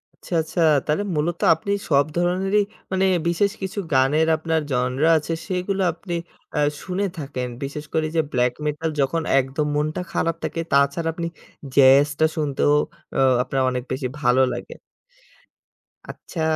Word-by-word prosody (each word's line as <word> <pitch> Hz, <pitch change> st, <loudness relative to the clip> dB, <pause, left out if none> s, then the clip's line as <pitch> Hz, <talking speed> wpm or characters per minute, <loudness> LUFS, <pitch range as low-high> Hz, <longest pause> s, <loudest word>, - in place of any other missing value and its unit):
আচ্ছা, -, -, -10 dB
আচ্ছা! 160 Hz, +2 st, -3 dB, 0.2 s
তাহলে 155 Hz, +7 st, 0 dB
মূলত 165 Hz, +3 st, -1 dB, 0.2 s
আপনি 200 Hz, +5 st, -5 dB, 0.2 s
সব 140 Hz, -1 st, +4 dB
ধরনেরই 190 Hz, +4 st, +2 dB, 0.3 s
মানে 190 Hz, 0 st, +2 dB, 0.2 s
বিশেষ 195 Hz, +4 st, +2 dB
কিছু 190 Hz, +2 st, -4 dB
গানের 145 Hz, +5 st, +3 dB
আপনার 160 Hz, 0 st, 0 dB
জনরা 130 Hz, +5 st, +1 dB
আছে, 155 Hz, +2 st, -3 dB
সেইগুলো 190 Hz, +1 st, -1 dB
আপনি 175 Hz, +1 st, -7 dB, 0.4 s
অ্যা 150 Hz, -, +1 dB, 0.2 s
শুনে 195 Hz, +2 st, -2 dB
থাকেন। 135 Hz, -4 st, -4 dB, 0.2 s
বিশেষ 150 Hz, +2 st, -5 dB
করে 160 Hz, -1 st, +1 dB
যে 160 Hz, -, +4 dB
ব্ল্যাক 125 Hz, 0 st, +1 dB
মেটাল 150 Hz, +2 st, -1 dB
যখন 150 Hz, +5 st, 0 dB, 0.2 s
একদম 135 Hz, +3 st, -1 dB
মনটা 155 Hz, +3 st, -1 dB
খারাপ 165 Hz, -1 st, 0 dB
থাকে। 165 Hz, -, -3 dB
তাছাড়া 140 Hz, +4 st, +2 dB
আপনি 170 Hz, 0 st, -3 dB, 0.5 s
জ্যাজটা 140 Hz, +3 st, +5 dB
শুনতেও 145 Hz, -1 st, +1 dB, 0.4 s
অ্যা -, -, +1 dB, 0.2 s
আপনার 135 Hz, +1 st, -1 dB
অনেক 125 Hz, -1 st, -3 dB
বেশি 130 Hz, 0 st, -2 dB
ভালো 125 Hz, -1 st, +4 dB
লাগে। -, -, -7 dB, 1.3 s
আচ্ছা! 165 Hz, -, -7 dB
155 Hz, 145 wpm, -22 LUFS, 140-170 Hz, 1.3 s, জ্যাজটা